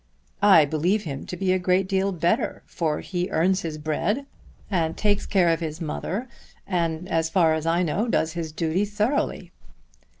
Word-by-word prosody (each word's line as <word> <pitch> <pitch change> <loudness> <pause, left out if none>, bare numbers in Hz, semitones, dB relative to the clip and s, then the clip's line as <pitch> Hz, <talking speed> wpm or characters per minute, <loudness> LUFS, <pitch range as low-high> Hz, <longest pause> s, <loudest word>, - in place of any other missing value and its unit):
"I 190 -7 +7
believe 170 +8 0
him 140 -4 -6
to 180 - -5
be 185 0 +1
a 185 - +1
great 185 +1 +2
deal 195 0 +1
better, 170 -1 0
for 155 -3 -2
he 180 -1 -3
earns 185 +4 +2
his 160 -2 -4
bread, 160 - -1 0.5
and 165 -4 0
takes 205 -1 +1
care 185 -4 +3
of 165 0 +2
his 160 -1 -4
mother, 185 +8 -3 0.4
and 170 -2 -1
as 165 -1 0
far 165 -2 +3
as 160 0 -2
I 170 +2 +2
know 200 +8 0
does 160 -8 0
his 165 -2 -4
duty 165 +4 0
thoroughly." 210 +6 -1
175 Hz, 175 wpm, -24 LUFS, 160-195 Hz, 0.5 s, I